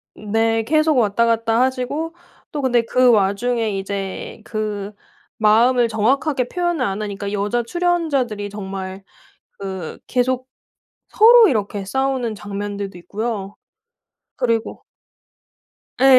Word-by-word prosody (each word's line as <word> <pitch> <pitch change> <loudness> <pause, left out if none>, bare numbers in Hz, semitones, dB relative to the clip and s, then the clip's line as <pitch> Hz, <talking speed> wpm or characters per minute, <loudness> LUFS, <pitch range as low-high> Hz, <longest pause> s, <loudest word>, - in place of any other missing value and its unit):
네. 225 +1 0
계속 310 +2 +2
왔다 230 0 +3
갔다 230 0 +2
하시고 265 +6 -1 0.4
또 290 - -3
근데 245 -3 +3
그 250 +2 +3
와중에 215 +1 +1
이제 195 +2 -5
그 210 -2 -3 0.5
마음을 235 +3 +4
정확하게 250 +4 +1
표현을 345 -6 -1
안 200 -1 -2
하니까 200 -1 -4
여자 210 +4 0
출연자들이 280 -10 0
정말 195 -1 -6 0.6
그 190 -4 -6
계속 255 0 0 0.6
서로 460 0 +7
이렇게 205 - -1
싸우는 260 -1 -1
장면들도 200 0 -5
있고요. 205 +1 -4 0.8
그리고 230 -3 -1 1.2
예. 265 - +4
225 Hz, 240 characters per minute, -20 LUFS, 205-255 Hz, 1.2 s, 서로